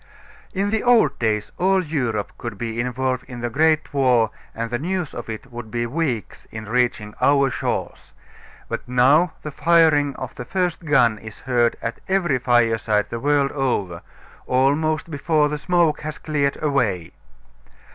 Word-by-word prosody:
In 200 Hz, +2 st, 0 dB
the 220 Hz, -, +1 dB
old 230 Hz, -, +3 dB
days 105 Hz, -2 st, 0 dB
all 190 Hz, +1 st, +3 dB
Europe 125 Hz, -, -2 dB
could 115 Hz, -4 st, -6 dB
be 115 Hz, +1 st, -4 dB
involved 125 Hz, +1 st, -1 dB
in 120 Hz, -2 st, -8 dB
a 120 Hz, -, -2 dB
great 155 Hz, +3 st, +2 dB
war 125 Hz, -5 st, +3 dB, 0.2 s
and 115 Hz, +1 st, -4 dB
the 120 Hz, -, -1 dB
news 180 Hz, +1 st, -2 dB
of 120 Hz, -, -7 dB
it 110 Hz, +4 st, -7 dB
would 120 Hz, -2 st, -8 dB
be 120 Hz, +1 st, -2 dB
weeks 125 Hz, -3 st, -3 dB
in 110 Hz, 0 st, -7 dB
reaching 115 Hz, -3 st, 0 dB
our 140 Hz, -1 st, +4 dB
shores, -, -, -4 dB, 0.5 s
but -, -, -5 dB
now 135 Hz, +8 st, +4 dB
the 150 Hz, -, -5 dB
firing 155 Hz, -3 st, +3 dB
of 130 Hz, -1 st, -6 dB
the 125 Hz, -, -7 dB
first 180 Hz, +3 st, -2 dB
gun 120 Hz, -8 st, +3 dB
is 110 Hz, 0 st, -11 dB
heard 120 Hz, -2 st, +1 dB
at 115 Hz, -, -4 dB
every 175 Hz, -9 st, +1 dB
fireside 115 Hz, -4 st, +2 dB
the 115 Hz, -, -3 dB
world 140 Hz, +1 st, +2 dB
over, 100 Hz, -11 st, -2 dB, 0.5 s
almost 150 Hz, +5 st, +1 dB
before 150 Hz, 0 st, +1 dB
the 150 Hz, 0 st, -3 dB
smoke 165 Hz, 0 st, +2 dB
has 155 Hz, +1 st, -5 dB
cleared 145 Hz, -3 st, -1 dB
away. 115 Hz, -, 0 dB
130 Hz, 160 wpm, -22 LUFS, 115-155 Hz, 0.5 s, our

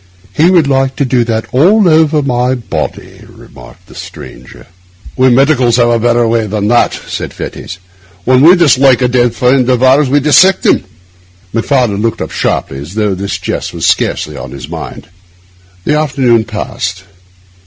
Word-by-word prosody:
He 165 Hz, +4 st, +3 dB
would 175 Hz, -5 st, +3 dB
like 135 Hz, -1 st, 0 dB
to 140 Hz, -, -1 dB
do 125 Hz, -1 st, +1 dB
that 115 Hz, -1 st, -2 dB
all 185 Hz, -, +3 dB
over 155 Hz, -2 st, +2 dB
my 125 Hz, -1 st, 0 dB
body,' 120 Hz, -3 st, -6 dB
remarked -, -, -16 dB
the -, -, -17 dB
stranger. 60 Hz, -, -12 dB, 0.5 s
'We 130 Hz, 0 st, +3 dB
medicals 130 Hz, -2 st, +2 dB
have 120 Hz, -1 st, +3 dB
a 115 Hz, -1 st, +1 dB
better 120 Hz, 0 st, +1 dB
way 115 Hz, -1 st, 0 dB
than 105 Hz, 0 st, -2 dB
that,' 120 Hz, 0 st, +1 dB
said -, -, -5 dB
Fettes. 90 Hz, -, -8 dB, 0.5 s
'When 130 Hz, +1 st, +3 dB
we 170 Hz, +5 st, +7 dB
dislike 135 Hz, -7 st, +3 dB
a -, -, +3 dB
dead 120 Hz, -1 st, 0 dB
friend 125 Hz, 0 st, +1 dB
of 125 Hz, 0 st, +1 dB
ours, 135 Hz, +2 st, +3 dB
we 145 Hz, +2 st, +2 dB
dissect 165 Hz, +7 st, +3 dB
him.' -, -, +2 dB, 0.7 s
Macfarlane 115 Hz, -3 st, 0 dB
looked 115 Hz, 0 st, -2 dB
up -, -, -8 dB
sharply, 65 Hz, -, -3 dB
as 75 Hz, +8 st, -10 dB
though 105 Hz, -2 st, 0 dB
this 100 Hz, +1 st, -4 dB
jest -, -, -5 dB
were -, -, -8 dB
scarcely 75 Hz, -, 0 dB
to 70 Hz, -2 st, -8 dB
his 70 Hz, 0 st, -9 dB
mind. -, -, -8 dB, 0.8 s
The 150 Hz, -, 0 dB
afternoon 130 Hz, -6 st, +1 dB
passed. 95 Hz, -2 st, -5 dB
125 Hz, 170 wpm, -11 LUFS, 115-140 Hz, 0.8 s, we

